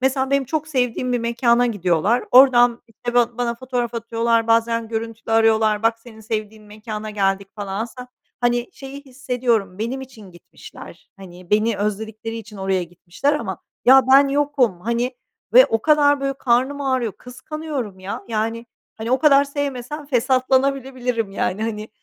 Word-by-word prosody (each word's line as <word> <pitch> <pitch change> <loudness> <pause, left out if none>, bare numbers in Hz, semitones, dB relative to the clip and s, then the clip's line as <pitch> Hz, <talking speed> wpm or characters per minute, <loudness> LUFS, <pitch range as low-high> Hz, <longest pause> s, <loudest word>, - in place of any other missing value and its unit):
mesela 265 +1 0
benim 275 -1 +2
çok 310 +3 -3
sevdiğim 250 -2 -1
bir 245 - +1
mekâna 235 +1 +2
gidiyorlar 200 +1 +1
oradan, 245 -2 +6
işte, 240 +2 -6
ba 240 -1 +2
bana 240 -1 -1
fotoğraf 245 -1 -3
atıyorlar, 230 0 0
bazen 230 0 +1
görüntülü 225 0 -5
arıyorlar: 220 -1 +3
"Bak 225 0 +2
senin 225 -1 -15
sevdiğin 215 0 -5
mekâna 215 0 -7
geldik." 195 -1 -1
falan 200 0 -4
aslında, 250 +2 -9 0.3
hani, 240 0 0
şeyi 275 +1 -9
hissediyorum, 250 -7 -2
benim 240 +5 -3
için 235 -7 -12
gitmişler, 175 - -14
hani, 180 -2 -13
beni 215 +1 +2
özledikleri 215 +2 -4
için 215 -2 -10
oraya 190 -1 -1
gitmişler 175 - -3
ama 190 - -4 0.3
ya 265 +1 +8
ben 275 +1 +7
yokum, 275 -9 +1
hani, 235 +4 -2 0.4
ve - - +8
o 225 -1 -1
kadar 290 -2 +4
böyle 275 0 -1
karnım 260 +3 0
ağrıyor, 260 -6 -1
kıskanıyorum 255 - -7
ya, 190 +2 -6
yani, 225 +1 -2 0.3
hani, 225 +1 -5
o 260 - +3
kadar 280 -2 +5
sevmesem 285 0 -5
fesatlanabilebilirim, 255 -3 0
yani, 195 +1 -2
hani, 215 -1 -4
235 Hz, 155 wpm, -21 LUFS, 215-260 Hz, 0.4 s, ya